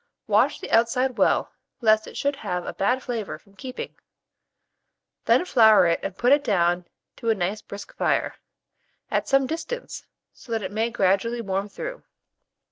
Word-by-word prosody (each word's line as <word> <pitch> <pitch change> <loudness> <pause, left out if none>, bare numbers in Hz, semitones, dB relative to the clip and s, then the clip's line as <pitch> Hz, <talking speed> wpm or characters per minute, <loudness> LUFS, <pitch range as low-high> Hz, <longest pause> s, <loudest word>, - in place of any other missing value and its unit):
Wash - - +2
the - - -8
outside 235 +3 +2
well, - - +2 0.3
lest 220 -3 +3
it - - -9
should 285 0 -1
have 180 -9 -3
a - - -5
bad 250 +7 0
flavour 230 -5 -4
from 200 -2 -25
keeping; 255 +4 -7 1.3
then 355 - +4
flour 220 - +6
it 170 -1 +2
and 195 - -5
put 245 +2 +2
it 285 0 +3
down 175 -3 +1 0.3
to 230 - -2
a 225 - +3
nice 195 +2 -2
brisk 200 0 -10
fire, - - 0 0.8
at - - 0
some 275 -1 +3
distance, 335 - -5 0.3
so 240 - -14
that 220 -2 -1
it 190 - -4
may 220 +3 0
gradually 230 +2 +1
warm 195 -2 -2
through. - - -6
225 Hz, 165 wpm, -24 LUFS, 195-255 Hz, 1.3 s, flour